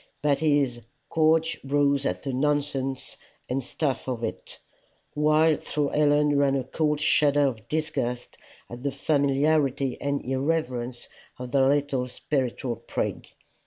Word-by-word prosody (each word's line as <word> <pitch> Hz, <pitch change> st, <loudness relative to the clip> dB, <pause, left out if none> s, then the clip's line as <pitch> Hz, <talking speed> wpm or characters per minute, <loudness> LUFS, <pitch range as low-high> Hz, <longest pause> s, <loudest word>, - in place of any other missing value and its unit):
But 145 Hz, -2 st, +2 dB
his 145 Hz, -6 st, +1 dB, 0.3 s
"gorge 160 Hz, 0 st, +2 dB
rose 140 Hz, 0 st, +2 dB
at 90 Hz, 0 st, -3 dB
the 135 Hz, -1 st, -3 dB
nonsense 135 Hz, -1 st, -1 dB, 0.3 s
and 130 Hz, +1 st, -2 dB
stuff 135 Hz, +1 st, -2 dB
of 120 Hz, -3 st, -3 dB
it," 115 Hz, -, -5 dB, 0.6 s
while 155 Hz, +1 st, +3 dB
through 145 Hz, -1 st, -2 dB
Helen 145 Hz, -1 st, +3 dB
ran 140 Hz, -1 st, +3 dB
a 135 Hz, -, 0 dB
cold 150 Hz, +2 st, 0 dB
shudder 145 Hz, -1 st, +3 dB
of 120 Hz, -4 st, -3 dB
disgust 130 Hz, -5 st, -2 dB, 0.3 s
at 120 Hz, +1 st, -9 dB
the 140 Hz, +1 st, -1 dB
familiarity 140 Hz, -2 st, +1 dB
and 140 Hz, 0 st, -2 dB
irreverence 130 Hz, -3 st, -2 dB, 0.3 s
of 125 Hz, -1 st, -7 dB
the 135 Hz, -, +3 dB
little 140 Hz, -2 st, +1 dB
spiritual 125 Hz, -1 st, -2 dB
prig. -, -, -4 dB
140 Hz, 130 wpm, -26 LUFS, 130-150 Hz, 0.6 s, while